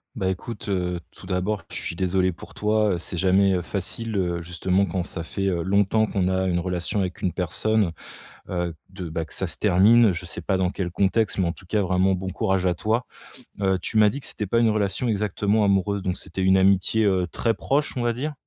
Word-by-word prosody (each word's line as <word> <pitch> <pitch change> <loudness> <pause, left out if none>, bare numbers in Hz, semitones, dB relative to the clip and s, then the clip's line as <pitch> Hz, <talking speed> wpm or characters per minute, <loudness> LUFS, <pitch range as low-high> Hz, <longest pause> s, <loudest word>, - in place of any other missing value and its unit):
Bah, 95 - -1
écoute, 100 +3 -5
heu, 90 -2 -1
tout - - -14
d'abord, 95 +1 -1
je - - -7
suis - - -4
désolé 95 +1 +1
pour 85 - -12
toi. 105 0 +1
Heu, - - -1
c'est 90 - -5
jamais, 95 +2 +3
heu, 90 - 0
facile, 105 +5 -3
heu, 85 -3 -1
justement, 90 +3 0
quand 90 +1 -2
ça 85 -1 -5
fait, 100 +3 -3
heu, 85 -3 0
longtemps 100 +3 +2
qu'on 95 -3 -1
a 95 0 +1
une 90 -2 +1
relation 90 +3 -2
avec 90 -1 -3
une 90 - 0
personne, 95 +2 0 0.6
heu, 90 -2 -2 0.2
de 95 -2 -7
bah, 80 0 -3
que - - -14
ça - - -1
se - - -3
termine. 105 +4 +5
Je 85 0 -6
sais - - -6
pas 95 -2 0
dans 95 -1 +2
quel 90 -1 -3
contexte, 100 +3 +1
mais 95 - +2
en - - -1
tout 95 - -15
cas 105 +4 0
vraiment, 95 0 +2
bon 95 +1 -4
courage 95 0 0
à 90 - +2
toi. 110 +6 -1 0.6
Heu, 95 -1 +2
tu 110 - -2
m'as 105 -1 +6
dit 140 - -5
que - - -9
c'était 105 - -3
pas 115 - +1
une 115 -1 +4
relation 105 +2 0
exactement 105 0 +1
amoureuse, 100 0 +1
donc 95 -1 -2
c'était 95 - -5
une 95 0 +4
amitié, 95 +3 +3
heu, 95 -3 +2
très 115 - +1
proche, 140 +8 -1
on 125 - -2
va 120 - +1
dire? 140 +6 -3
95 Hz, 235 wpm, -24 LUFS, 90-105 Hz, 0.6 s, m'as